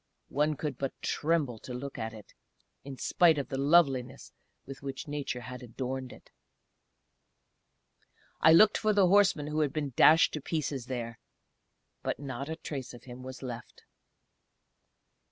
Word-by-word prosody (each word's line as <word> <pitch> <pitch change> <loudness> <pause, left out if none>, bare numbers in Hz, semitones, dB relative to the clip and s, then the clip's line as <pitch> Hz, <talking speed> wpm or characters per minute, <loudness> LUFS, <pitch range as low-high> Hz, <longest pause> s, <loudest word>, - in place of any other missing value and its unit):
One 150 +2 +1
could 145 -4 -4
but 135 -1 -4
tremble 150 -7 0
to 125 - -8
look 135 +1 -6
at 110 0 -3
it, 110 -2 -13 0.5
in 135 -1 -8
spite 165 +4 +3
of 140 -2 -3
the 135 - -3
loveliness 140 -4 +2 0.3
with 135 -1 -9
which 140 +3 -6
Nature 145 -4 -4
had 125 +1 -8
adorned 130 +1 -5
it. - - -16 2.1
I 160 - +6
looked 210 +6 +6
for 215 -1 +2
the 200 -2 +5
horseman 190 -5 +4
who 150 +1 -2
had 150 -3 +1
been 145 -3 -3
dashed 160 +1 +6
to 150 - -4
pieces 140 -5 -3
there, 120 -3 -5 0.8
but - - -2
not 140 0 -5
a 160 - -3
trace 135 -6 -6
of 120 - -14
him 125 0 -10
was 130 +1 -9
left. 120 -2 -8
140 Hz, 155 wpm, -30 LUFS, 125-155 Hz, 2.1 s, I